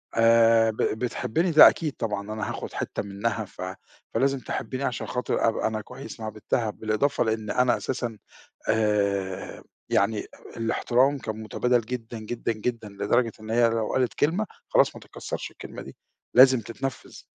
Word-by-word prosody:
آآ 115 0 +5
ب - - -12
بتحبّني 125 +8 0
ده 155 - +10
أكيد 155 -4 -3
طبعًا، 105 -2 -3
أنا 110 - -3
هاخد - - -6
حتّة - - -3
منها 105 +2 -2
ف - - -13 0.5
فلازم 135 +3 +2
تحبّني 130 +1 -4
عشان 125 -3 -2
خاطر 125 -2 0
أبقى 110 - -1
أنا 110 -1 -2
كويس 130 +2 -10
مع 110 0 -4
بنْتها، 110 +1 -1
بالإضافة 110 +8 0
لإن 110 -2 -2
أنا 125 -1 +3
أساسًا 120 -4 -3 0.5
آآ 100 -3 0 0.3
يعني 105 +1 +2
أ - - -14
الاحترام 125 +4 +2
كان 110 -2 -5
متبادل 125 +2 +1
جدًا، 115 -1 -6
جدًا، 115 +1 -3
جدًا 110 0 -3
لدرجة 115 +4 +1
إن 110 - -9
هي 120 0 +4
لو 115 -1 -1
قالت 130 -2 +1
كلمة 175 +9 +1 0.2
خلاص - - +3
ما - - -10
تتْكسَّرش - - -6
الكلمة - - -9
دي، - - -12 0.4
لازم 130 -1 +8
تتْنفِّذ. 120 +4 -6
115 Hz, 160 wpm, -26 LUFS, 110-125 Hz, 0.5 s, ده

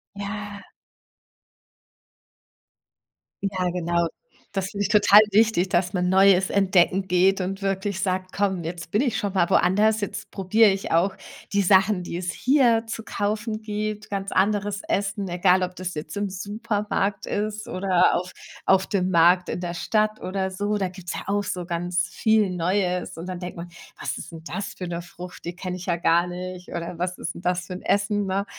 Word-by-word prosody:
Ja. 205 0 -6 2.8
Ja, 190 -2 -1
genau. 170 -1 0 0.5
Das 195 -2 -1
finde 205 0 -2
ich - - -1
total 210 -1 +7
wichtig, 210 -3 +3
dass 175 0 +1
man 180 -1 +1
Neues 190 0 +5
entdecken 190 -1 +3
geht 185 +2 +3
und 190 +2 -3
wirklich 195 0 -1
sagt: 185 -1 -1
„Komm, 190 -3 0
jetzt 170 +1 -6
bin 210 - +2
ich 255 -5 0
schon 200 -2 -2
mal 180 -3 +3
woanders. 215 +4 +3
Jetzt 205 - -5
probiere 210 +3 +4
ich 195 0 -4
auch 185 +4 +2 0.4
die 200 - +3
Sachen, 195 0 +4
die 175 -1 -5
es 175 -1 -3
hier 245 - +3
zu 225 0 -5
kaufen 215 +1 -2
gibt, 215 0 -4
ganz 195 0 -3
anderes 205 +1 +1
Essen, 200 0 -1
egal 180 +1 +3
ob 180 0 -2
das 185 0 -5
jetzt 155 +3 -6
im 205 0 -1
Supermarkt 205 0 -2
ist 210 0 -3
oder 185 -1 +2
auf 180 +1 -3 0.3
auf 190 0 +3
dem 185 -2 0
Markt 175 +1 +4
in - - -3
der 175 -1 -4
Stadt 215 +4 0
oder 190 0 -2
so.“ 205 +2 -1
Da 195 -2 0
gibt's 180 -1 -7
ja - - -5
auch 205 0 0
so 180 -2 -4
ganz 175 +1 -1
viel 220 -2 +2
Neues. 180 0 -1
Und 165 +2 -7
dann 185 -1 -5
denkt 180 -1 -7
man: 170 +1 -7 0.3
„Was - - -3
ist - - -8
'n 160 -1 -9
das 200 +3 -4
für 180 - -6
'ne 170 0 -4
Frucht? 180 0 -11
Die 170 - -5
kenne 185 0 -5
ich 180 - -8
ja 175 -2 0
gar 170 0 +3
nicht. 180 0 -7
Oder 170 0 -5
was 180 +1 -2
ist - - -4
'n - - -9
das 180 0 -1
für 185 - -6
'n 180 - -7
Essen, 205 0 +1
ne?“ 195 +1 -1
190 Hz, 185 wpm, -24 LUFS, 180-205 Hz, 2.8 s, total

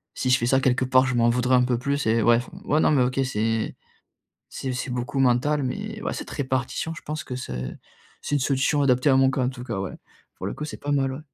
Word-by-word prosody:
si 130 - -1
je 125 - +5
fais 120 - -1
ça, 130 +2 +4
quelque 130 -1 +2
part 130 0 +4
je 135 -1 -1
m'en 120 0 +4
voudrais 125 +2 +2
un 125 - +5
peu 125 -1 +1
plus 140 +2 -1
et 115 +1 +3
ouais 115 +1 +5
enfin. 120 - -5
Ouais, 150 - +2
non - - +4
mais 140 -4 +4
OK 130 +2 -1
c'est 110 -2 -1 0.7
c'est 130 - -4
c'est 125 +1 -4
beaucoup 125 +2 -3
mental, 135 +3 +2
mais 205 +11 -4
ouais, - - -2
cette - - -6
répartition, 130 +3 -2
je - - -9
pense 155 +1 -4
que 125 - -6
c'est 65 - -5 0.5
c'est 145 - -2
une 145 - +1
solution 135 +2 +1
adaptée 130 +1 +3
à 135 - +5
mon 135 0 +4
cas, 130 - -1
en 125 - +1
tout 125 -2 -8
cas, 115 -6 -4
ouais! 95 -1 -4 0.4
Pour 95 - -7
le - - -3
coup, - - -6
c'est - - -7
pas 145 - -4
mal, 135 -2 +1
ouais. 135 - -6
130 Hz, 265 wpm, -24 LUFS, 125-140 Hz, 0.7 s, je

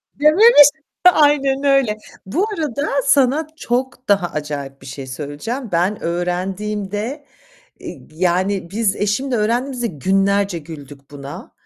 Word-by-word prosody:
Dememiş. 305 - +7 0.5
Aynen 285 -2 +2
öyle. 270 -6 +2 0.3
Bu 340 - 0
arada 290 -2 -2 0.2
sana 280 +2 +3
çok 255 -1 -3
daha 200 -3 +3
acayip 145 -3 -6
bir - - -12
şey 135 0 -7
söyleyeceğim. 150 - -5
Ben 180 +5 0
öğrendiğimde, 195 - -3 0.6
eee, - - -8
yani, 185 +2 0
biz 210 -1 0
eşimle 240 +5 -1
öğrendiğimizde, 240 +3 -1
günlerce 195 - 0
güldük 145 -3 -12
buna. 140 -1 -9
205 Hz, 115 wpm, -19 LUFS, 170-265 Hz, 0.6 s, Dememiş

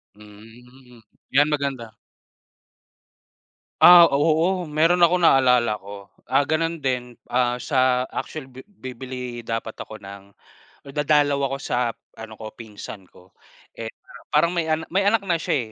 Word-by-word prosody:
Hmm, 115 +4 -17 0.3
'yan 145 +2 +4
maganda. 135 -6 -3 1.9
Ah, 175 -1 +10
oo, 165 +5 +1
meron 165 +4 +2
akong 175 +1 +4
naalala 125 -6 +3
ko, 100 0 -11 0.2
ah, 145 - +3
ganun 165 +2 -1
din, 125 -2 -3
ah, 125 0 +1
sa 130 -1 +1
actually 155 -3 -5
bi 130 +1 -11
bibili 125 - -8
dapat 115 -1 -4
ako 110 - -8
ng 100 -1 -11 0.7
dadalaw 145 -1 +2
ako 135 - -3
sa 135 - -3 0.4
ano 110 -1 -9
ko 110 -1 -8
pinsan 105 -3 -10
ko, 90 +1 -21 0.4
eh, 115 -1 -6 0.4
parang 160 +3 +2
may 170 -2 -1
a 155 - +2 0.2
may 195 +1 +2
anak 210 -1 +2
na 170 -3 0
siya, 140 -11 -2
130 Hz, 135 wpm, -23 LUFS, 115-155 Hz, 1.9 s, Ah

